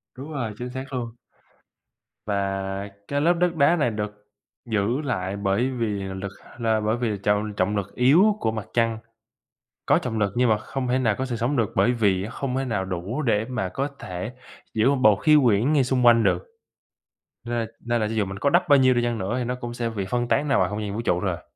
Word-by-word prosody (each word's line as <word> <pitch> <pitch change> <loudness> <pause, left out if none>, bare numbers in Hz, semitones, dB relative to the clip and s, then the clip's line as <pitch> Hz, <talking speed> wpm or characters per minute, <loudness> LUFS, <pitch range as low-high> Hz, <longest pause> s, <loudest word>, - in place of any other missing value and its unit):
Đúng 140 +4 -8
rồi, 120 -7 -3
chính 125 +2 -5
xác 130 +2 -7
luôn. 120 -2 -3 1.2
Và 100 -1 -2 0.2
cái 145 0 -1
lớp 170 +4 +4
đất 175 0 0
đá 155 +2 +4
này 150 -7 +1
được 105 -1 -5 0.4
giữ 110 +5 0
lại 100 -9 -2
bởi 100 +6 +1
vì 120 -4 -2 0.2
lực 95 0 -5 0.3
là 110 -2 +1
bởi 110 +2 0
vì 120 -2 -1
là 105 - -2
trọng 105 +1 +1
trọng 100 +1 0
lực 100 -1 -4
yếu 175 +12 +5
của 110 - 0
Mặt 110 -2 -5
Trăng, 115 -1 +1 0.9
có - - +4
trọng 115 -3 -3
lực 100 -2 +1
nhưng 125 0 +3
mà 110 - +4
không 130 +4 -4
thể 125 +1 +1
nào 115 -5 +2
có 130 - -1
sự 125 -2 -3
sống 120 +5 -1
được, 115 -3 +1
bởi 125 - +4
vì 100 -6 +1
không 130 0 -3
thể 135 - -1
nào 105 -6 -1
đủ 95 - -3
để 110 -6 +1
mà 125 -8 -2
có 135 +9 -2
thể 90 +5 -5 0.4
giữ 110 +4 +3
một 140 - +3
bầu 110 -4 +6
khí 155 +8 +4
quyển 120 +5 +3
ngay 145 -3 +4
xung 125 -1 +1
quanh 115 -1 +6
được. - - +1 1.0
Nên 120 -1 -2 0.2
nên 120 0 +1
là 110 - +1
cho 110 - -4
dù 110 -2 +1
mình 95 0 -6
có 140 - +2
đắp 175 +3 +3
bao 145 - +7
nhiêu 130 -1 +5
đi 120 - +1
chăng 120 -1 -1
nữa 100 +3 -2
thì 125 - -1
nó 125 +1 -2
cũng 120 -1 -6
sẽ 120 -1 -2
bị 100 -4 -4
phân 120 -1 0
tán 150 - +1
nào 140 - +3
vào - - +2
không 105 +1 -4
gian 100 -1 -4
vũ 110 - -2
trụ 90 - +1
thôi 95 - 0
à. 90 - -15
115 Hz, 240 wpm, -24 LUFS, 105-130 Hz, 1.2 s, bao